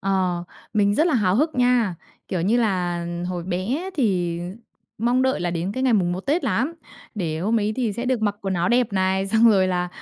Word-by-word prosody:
Ờ, 185 Hz, -3 st, 0 dB, 0.3 s
mình 205 Hz, -1 st, +2 dB
rất 315 Hz, +7 st, +3 dB
là 320 Hz, -, +1 dB
háo 190 Hz, -5 st, +2 dB
hức 310 Hz, +5 st, +1 dB
nha. 245 Hz, -6 st, +2 dB, 0.3 s
Kiểu 180 Hz, -3 st, -1 dB
như 210 Hz, +7 st, +2 dB
là 180 Hz, -6 st, 0 dB, 0.2 s
hồi 175 Hz, -2 st, -3 dB
bé 225 Hz, -, -2 dB
thì, 180 Hz, -, 0 dB
ờ, -, -, -5 dB, 0.5 s
mong 245 Hz, +4 st, +2 dB
đợi 260 Hz, -5 st, +1 dB
là 175 Hz, -, -1 dB
đến 175 Hz, +3 st, -2 dB
cái 260 Hz, -, -3 dB
ngày 260 Hz, -2 st, +3 dB
mùng 180 Hz, -4 st, +2 dB
1 185 Hz, -, -3 dB
Tết 295 Hz, -, 0 dB
lắm, 285 Hz, +8 st, 0 dB, 0.4 s
để 165 Hz, -6 st, -2 dB
hôm 215 Hz, +5 st, +1 dB
ấy 210 Hz, +1 st, 0 dB
thì 235 Hz, -5 st, 0 dB
sẽ 235 Hz, +5 st, -4 dB
được 250 Hz, -3 st, 0 dB
mặc 205 Hz, -1 st, 0 dB
quần 195 Hz, -1 st, -2 dB
áo 175 Hz, +1 st, +1 dB
đẹp 240 Hz, -3 st, +2 dB
này, 190 Hz, 0 st, +1 dB
xong 225 Hz, +3 st, +5 dB
rồi 190 Hz, -3 st, +4 dB
là, 180 Hz, -1 st, -1 dB
200 Hz, 230 wpm, -23 LUFS, 180-240 Hz, 0.5 s, xong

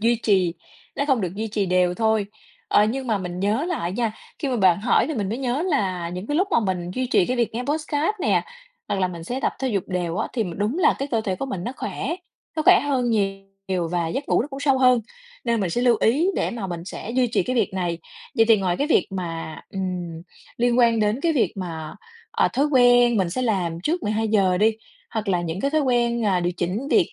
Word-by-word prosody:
duy 235 Hz, +2 st, +3 dB
trì, 185 Hz, -5 st, +2 dB, 0.4 s
nó 280 Hz, -, 0 dB
không 265 Hz, -6 st, +2 dB
được 185 Hz, -1 st, -3 dB
duy 220 Hz, +2 st, -3 dB
trì 205 Hz, -2 st, -1 dB
đều 180 Hz, 0 st, +2 dB
thôi. 220 Hz, -1 st, +1 dB, 0.4 s
Ờ, 205 Hz, -, +5 dB
nhưng 255 Hz, +4 st, -2 dB
mà 220 Hz, -3 st, +1 dB
mình 180 Hz, -1 st, -5 dB
nhớ 215 Hz, +9 st, +1 dB
lại 185 Hz, -, -2 dB
nha, 225 Hz, +1 st, -1 dB, 0.3 s
khi 290 Hz, -, -2 dB
mà 255 Hz, -, 0 dB
bạn 190 Hz, -3 st, +4 dB
hỏi 240 Hz, -, +3 dB
thì 310 Hz, -, -3 dB
mình 200 Hz, -4 st, -2 dB
mới 230 Hz, +4 st, -3 dB
nhớ 265 Hz, +4 st, -1 dB
là 190 Hz, -, -1 dB
những 180 Hz, +3 st, -6 dB
cái 290 Hz, -, -1 dB
lúc 380 Hz, +3 st, +2 dB
mà 280 Hz, -, +3 dB
mình 185 Hz, -4 st, -2 dB
duy 255 Hz, +7 st, -2 dB
trì 190 Hz, -7 st, +3 dB
cái 255 Hz, -, -1 dB
việc 235 Hz, -2 st, 0 dB
nghe 245 Hz, -, -2 dB
podcast 305 Hz, +3 st, 0 dB
nè, -, -, +2 dB, 0.5 s
hoặc 195 Hz, -, -1 dB
là 185 Hz, -, +2 dB
mình 170 Hz, -2 st, -8 dB
sẽ 250 Hz, +8 st, -3 dB
tập -, -, 0 dB
thể 265 Hz, -, -1 dB
dục 200 Hz, -6 st, -1 dB
đều 175 Hz, -2 st, -2 dB
á, 220 Hz, -, -1 dB
thì 225 Hz, -4 st, 0 dB
đúng 215 Hz, -, -1 dB
là 360 Hz, -, +4 dB
cái 275 Hz, +1 st, -3 dB
cơ 230 Hz, -, +1 dB
thể 195 Hz, -4 st, -2 dB
của 270 Hz, -, -4 dB
mình 185 Hz, -9 st, -4 dB
nó 245 Hz, -, -3 dB
khỏe, 315 Hz, -, -3 dB, 0.4 s
nó 310 Hz, -, +1 dB
khỏe -, -, +7 dB
hơn 260 Hz, -4 st, 0 dB
nhiều 195 Hz, -3 st, -2 dB
và 170 Hz, -2 st, 0 dB
giấc 270 Hz, -, -4 dB
ngủ -, -, +3 dB
nó 285 Hz, -, -6 dB
cũng 275 Hz, -1 st, -7 dB
sâu 275 Hz, -2 st, +3 dB
hơn, 250 Hz, -2 st, +5 dB, 0.4 s
nên 235 Hz, -2 st, +1 dB
mình 185 Hz, -, -1 dB
sẽ 240 Hz, -, 0 dB
lưu 245 Hz, -2 st, +4 dB
ý 280 Hz, +10 st, +3 dB
để -, -, 0 dB
mà 225 Hz, -5 st, -4 dB
mình 170 Hz, -2 st, -5 dB
sẽ 195 Hz, +3 st, -7 dB
duy 250 Hz, +1 st, +2 dB
trì 235 Hz, -, +1 dB
cái 255 Hz, 0 st, -2 dB
việc 215 Hz, -4 st, +1 dB
này. 175 Hz, -3 st, -1 dB, 0.4 s
Vậy 225 Hz, -, +6 dB
thì 225 Hz, -, +7 dB
ngoài 180 Hz, -2 st, 0 dB
cái 285 Hz, -, 0 dB
việc 310 Hz, -, +3 dB
mà, 165 Hz, -4 st, -5 dB
ừm, 180 Hz, -4 st, -4 dB, 0.3 s
liên 240 Hz, 0 st, +2 dB
quan 230 Hz, -2 st, +4 dB
đến 215 Hz, +4 st, +1 dB
cái 330 Hz, +2 st, +2 dB
việc 270 Hz, -7 st, +1 dB
mà, 165 Hz, -5 st, -5 dB, 0.4 s
ờ, -, -, +2 dB
thói 280 Hz, +3 st, +2 dB
quen 245 Hz, -4 st, +5 dB
mình 185 Hz, -4 st, +1 dB
sẽ 255 Hz, -, -2 dB
làm 180 Hz, -8 st, -1 dB
trước 330 Hz, -, -1 dB
12:00 210 Hz, -4 st, +1 dB
đi, 220 Hz, +2 st, +3 dB, 0.3 s
hoặc 220 Hz, -2 st, -3 dB
là 180 Hz, -2 st, +2 dB
những 170 Hz, +2 st, -4 dB
cái 275 Hz, -, 0 dB
thói 310 Hz, +1 st, +2 dB
quen, 240 Hz, -3 st, +1 dB
à, 185 Hz, -3 st, +2 dB
điều 175 Hz, 0 st, 0 dB
chỉnh 195 Hz, +12 st, -2 dB
việc 385 Hz, -6 st, +3 dB
220 Hz, 250 wpm, -23 LUFS, 185-255 Hz, 0.5 s, khỏe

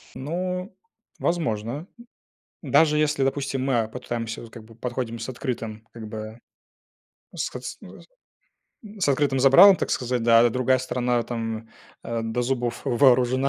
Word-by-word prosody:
Ну, 180 Hz, -, -4 dB, 0.4 s
возможно. 140 Hz, -, -2 dB, 0.7 s
Даже 150 Hz, -2 st, +3 dB
если, 150 Hz, -2 st, +1 dB
допустим, 135 Hz, -1 st, -1 dB
мы, 130 Hz, -3 st, +2 dB
а, 110 Hz, -, -3 dB
попытаемся, 115 Hz, -1 st, -5 dB
вот, 115 Hz, -, -12 dB
как 115 Hz, -1 st, -11 dB
бы, 115 Hz, +1 st, -16 dB
подходим 120 Hz, 0 st, -4 dB
с 115 Hz, -, -5 dB
открытым, 115 Hz, -4 st, -5 dB
как 115 Hz, -2 st, -8 dB
бы 110 Hz, +1 st, -7 dB, 1.0 s
с -, -, -2 dB
кыт -, -, -9 dB
с -, -, -6 dB
ны -, -, -12 dB
зым -, -, -14 dB, 1.0 s
с 180 Hz, -, 0 dB
открытым 140 Hz, -1 st, +1 dB
забралом, 175 Hz, +9 st, +8 dB
так -, -, -3 dB
сказать, 125 Hz, -1 st, -1 dB
да, 115 Hz, 0 st, +6 dB
это 120 Hz, -, +5 dB
другая 130 Hz, +2 st, +2 dB
сторона, 125 Hz, -1 st, 0 dB
там, 115 Hz, -1 st, -5 dB, 0.3 s
до, 115 Hz, +1 st, -3 dB
э, -, -, +1 dB
зубов 120 Hz, -1 st, -2 dB
вооружена 130 Hz, +1 st, +3 dB
125 Hz, 155 wpm, -24 LUFS, 115-135 Hz, 1.0 s, забралом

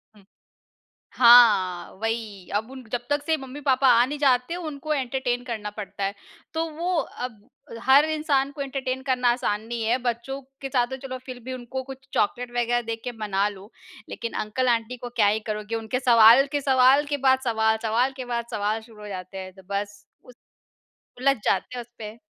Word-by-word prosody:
हुँ। 200 Hz, -, -19 dB, 0.9 s
हाँ, 225 Hz, -8 st, +6 dB
वही 220 Hz, -4 st, -4 dB
अब 220 Hz, +4 st, -1 dB
उन 260 Hz, -1 st, -9 dB
जब 245 Hz, 0 st, -1 dB
तक 290 Hz, 0 st, 0 dB
से 320 Hz, -, +2 dB
मम्मी-पापा 270 Hz, 0 st, 0 dB
आ 240 Hz, +1 st, +5 dB
नहीं 290 Hz, +2 st, -5 dB
जाते 265 Hz, +3 st, +2 dB
उनको 310 Hz, -3 st, -4 dB
एंटरटेन 255 Hz, -2 st, -1 dB
करना 215 Hz, -3 st, -4 dB
पड़ता 200 Hz, -1 st, -5 dB
है। 195 Hz, +1 st, -1 dB, 0.4 s
तो 325 Hz, 0 st, 0 dB
वो 355 Hz, +1 st, -1 dB
अब 245 Hz, -5 st, -6 dB, 0.4 s
हर 275 Hz, +3 st, +6 dB
इंसान 285 Hz, -3 st, +1 dB
को 280 Hz, -, -7 dB
एंटरटेन 265 Hz, -1 st, -3 dB
करना 250 Hz, -2 st, +2 dB
आसान 210 Hz, -4 st, -1 dB
नहीं 235 Hz, -1 st, -3 dB
है। 240 Hz, +3 st, +2 dB
बच्चों 245 Hz, +4 st, -3 dB, 0.2 s
के 270 Hz, -, -4 dB
साथ 245 Hz, -3 st, +2 dB
तो 265 Hz, +1 st, -6 dB
चलो 255 Hz, 0 st, -5 dB
फिर 255 Hz, -2 st, -7 dB
भी 260 Hz, 0 st, -5 dB
उनको 255 Hz, +1 st, -5 dB
कुछ 265 Hz, 0 st, -11 dB
चॉकलेट 240 Hz, +4 st, 0 dB
वगैरह 240 Hz, 0 st, +1 dB
दे 230 Hz, 0 st, -4 dB
के 245 Hz, -, -3 dB
मना 205 Hz, -1 st, 0 dB
लो, 200 Hz, +2 st, -12 dB, 0.4 s
लेकिन 230 Hz, -, -5 dB
अंकल-आंटी 240 Hz, +1 st, 0 dB
को 245 Hz, 0 st, -7 dB
क्या 220 Hz, -4 st, +2 dB
ही 215 Hz, +2 st, +2 dB
करोगे। 210 Hz, +1 st, -3 dB
उनके 225 Hz, +3 st, -2 dB
सवाल 235 Hz, +1 st, +7 dB
के 290 Hz, -1 st, 0 dB
सवाल 265 Hz, +2 st, +5 dB
के 290 Hz, 0 st, -2 dB
बाद 260 Hz, 0 st, +5 dB
सवाल, 220 Hz, -2 st, +2 dB
सवाल 235 Hz, +4 st, +1 dB
के 255 Hz, -, -5 dB
बाद 235 Hz, 0 st, -1 dB
सवाल 215 Hz, +2 st, -1 dB
शुरू 220 Hz, -2 st, -16 dB
हो 210 Hz, -, -8 dB
जाते 185 Hz, 0 st, -7 dB
हैं 185 Hz, -1 st, -7 dB
तो 190 Hz, 0 st, -16 dB
बस 200 Hz, 0 st, -4 dB, 0.2 s
उस 250 Hz, -, -16 dB, 0.9 s
उलझ 275 Hz, +1 st, +3 dB
जाते 195 Hz, +6 st, 0 dB
हैं 240 Hz, -, -5 dB
उसपे। 225 Hz, -2 st, -10 dB
245 Hz, 190 wpm, -25 LUFS, 220-265 Hz, 0.9 s, सवाल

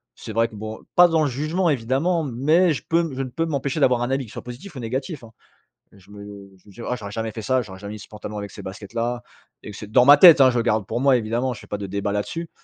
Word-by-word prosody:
C'est 110 Hz, -, -9 dB
vrai 115 Hz, +1 st, +1 dB
que 110 Hz, -, -14 dB
bon, 110 Hz, +1 st, -7 dB, 0.2 s
pas 175 Hz, 0 st, +8 dB
dans 165 Hz, -2 st, +1 dB
le 145 Hz, -, +1 dB
jugement, 155 Hz, +7 st, -1 dB
évidemment, 145 Hz, +6 st, 0 dB
mais 155 Hz, +7 st, +2 dB
je -, -, -6 dB
peux 165 Hz, 0 st, +1 dB
je 135 Hz, -, -3 dB
ne 130 Hz, -, -6 dB
peux 165 Hz, +6 st, -2 dB
m'empêcher 140 Hz, -1 st, -2 dB
d'avoir 125 Hz, -3 st, +3 dB
un 120 Hz, +2 st, -2 dB
avis, 135 Hz, -1 st, -1 dB
qu'il 115 Hz, -, -14 dB
soit 120 Hz, -, -7 dB
positif 125 Hz, +9 st, -10 dB
ou 130 Hz, -, -6 dB
négatif, 130 Hz, +4 st, -4 dB
hein. 115 Hz, -, -13 dB, 0.6 s
Je 100 Hz, 0 st, -20 dB
me 100 Hz, 0 st, -10 dB, 0.3 s
je 95 Hz, -, -31 dB
vais -, -, -18 dB
me -, -, -15 dB
dire: 115 Hz, -, -9 dB
«Oh, -, -, 0 dB
j'aurais 100 Hz, -4 st, -8 dB
jamais 110 Hz, 0 st, -4 dB
fait 110 Hz, -, -7 dB
ça, 130 Hz, +2 st, 0 dB
j'aurais 95 Hz, -3 st, -11 dB
jamais 100 Hz, +1 st, -7 dB
mis 105 Hz, -, -8 dB
ce -, -, -12 dB
pantalon 105 Hz, 0 st, -8 dB
avec 100 Hz, -1 st, -6 dB
ces -, -, -10 dB
baskets-là», 115 Hz, +5 st, -5 dB, 0.4 s
et 105 Hz, -, -9 dB
cet 105 Hz, +1 st, -10 dB
dans 125 Hz, +1 st, +5 dB
ma 145 Hz, +1 st, +9 dB
tête, 170 Hz, -2 st, +9 dB
hein, 130 Hz, -, +6 dB
je 120 Hz, -, 0 dB
garde 110 Hz, -3 st, 0 dB
pour 120 Hz, -, -3 dB
moi, 135 Hz, -2 st, +4 dB
évidemment, 120 Hz, +3 st, -2 dB
je 110 Hz, -, -11 dB
fais -, -, -15 dB
pas 105 Hz, -, -4 dB
de 100 Hz, -, -5 dB
débats 100 Hz, +1 st, -3 dB
là-dessus. 160 Hz, +11 st, -4 dB
120 Hz, 290 wpm, -22 LUFS, 105-140 Hz, 0.6 s, ma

